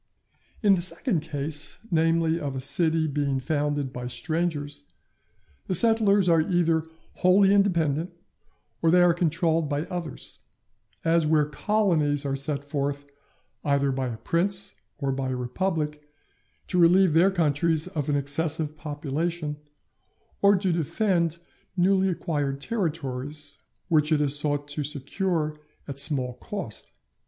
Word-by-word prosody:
In 205 -2 +6
the 180 - +1
second 185 - +1
case, 150 0 -2
namely 165 0 +2
of 140 -2 -4
a - - -3
city 160 +4 +1
being 140 -2 -1
founded 145 -1 -1
by 125 0 -5
strangers, 150 - -3 0.8
the 185 - +1
settlers 205 -2 +4
are 165 -2 +5
either 165 -1 +1 0.3
wholly 195 +2 +5
independent, 170 -5 +1 0.7
or 165 - +3
they 180 +1 +5
are 175 -1 +5
controlled 165 -2 0
by 145 0 -1
others, 170 -4 -7 0.7
as 165 -1 +3
where 150 -1 +3
colonies 150 -4 0
are 135 -1 -1
sent 140 +1 -2
forth 145 0 -3 0.5
either 140 -1 +1
by 130 -1 -2
a 115 -2 -5
prince 190 - 0 0.2
or 140 -2 -1
by 130 0 -2
a 130 - -2
republic, 150 +4 -2 0.6
to 180 - -1
relieve 175 0 +5
their 170 +4 +5
countries 160 -2 +1
of 155 -6 -3
an 145 - +2
excessive 150 +2 -1
population, 150 +1 -3 0.8
or 200 0 +6
to 185 -1 0
defend 170 0 0 0.4
newly 190 +1 +3
acquired 145 -6 -2
territories 150 - -4 0.3
which 155 -2 +2
it 155 - +4
is 145 -1 +2
sought 145 -1 -1
to 145 +1 -3
secure 150 +2 -2 0.3
at 140 -1 -3
small 135 -4 +2
cost. 180 - -7
155 Hz, 135 wpm, -26 LUFS, 145-175 Hz, 0.8 s, In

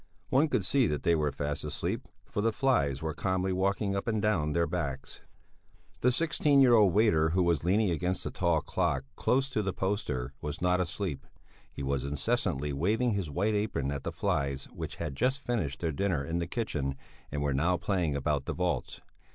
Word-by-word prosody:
One 140 +5 +4
could 105 -10 0
see 130 +3 +3
that 75 - -2
they 85 - +4
were 75 -3 +1
fast 70 0 -3
asleep, - - -3 0.2
for 105 - -3
the 115 +2 +2
flies 105 - +1
were 80 -1 -1
calmly 95 +1 0
walking 100 +2 0
up 100 - -3
and 110 -2 +1
down 85 -8 +1
their 85 +1 +2
backs. 75 -6 -4 0.8
The 125 - +3
sixteen 150 0 +3
year 130 -3 +7
old 105 -5 +6
waiter 85 -6 +4
who 90 +3 +2
was 85 -4 +1
leaning 100 +2 +2
against 90 +3 -1
the - - -3
tall 85 -4 +1
clock 70 - 0
close 135 +1 +2
to 110 - 0
the 95 -2 -2
poster 75 - -2
was 75 0 -4
not 90 +1 +2
asleep; 85 -6 -3 0.4
he - - -6
was 70 -1 -1
incessantly 70 0 -1
waving 110 - +1
his 100 -6 -2
white 100 +9 0
apron 105 -10 -1
at 70 -1 -3
the - - -4
flies 70 0 -1
which - - -6
had 75 -4 -4
just 130 - +1
finished 105 - -2
their 85 -2 0
dinner 80 -3 0
in 80 +3 -2
the 85 - -2
kitchen 75 - -2 0.4
and 70 0 -2
were 70 -1 +1
now 85 +7 +2
playing 85 -6 0
about 70 0 0
the - - -2
vaults. 90 -8 -2
85 Hz, 200 wpm, -30 LUFS, 70-105 Hz, 0.8 s, year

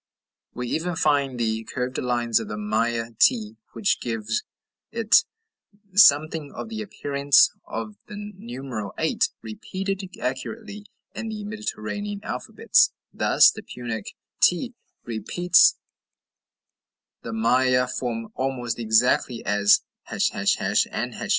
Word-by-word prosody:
We 125 0 -4
even 175 +2 -2
find 140 -5 +1
the 110 -1 -1
curved 125 +2 -4
lines 120 -2 +1
of - - -6
the 105 - -5
Maya 115 +2 -1
t 225 -3 +3 0.2
which 205 - 0
give 115 -3 -4 0.6
it 225 -1 +4 0.7
something 155 -5 +5
of - - -6
the 220 -1 -5
appearance 140 -8 +3 0.2
of 110 -2 -6
the 210 - -9 0.2
numeral 120 - -6
8, - - +1
repeated 195 - -4 0.2
accurately 205 - -5 0.3
in 225 - -5
the 215 -1 -5
Mediterranean 205 - -4
alphabets; - - +2 0.2
thus - - +5
the - - -9
Punic 115 -4 -6 0.2
t 235 +8 +3 0.3
repeats 170 +10 +3 1.4
the 115 - -6
Maya 125 +3 +3
form 115 -3 -4
almost 130 -3 -3
exactly 115 +1 +2
as 100 0 +4 0.3
### - - +1
and - - -3
###. - - -5
130 Hz, 115 wpm, -24 LUFS, 115-195 Hz, 1.4 s, something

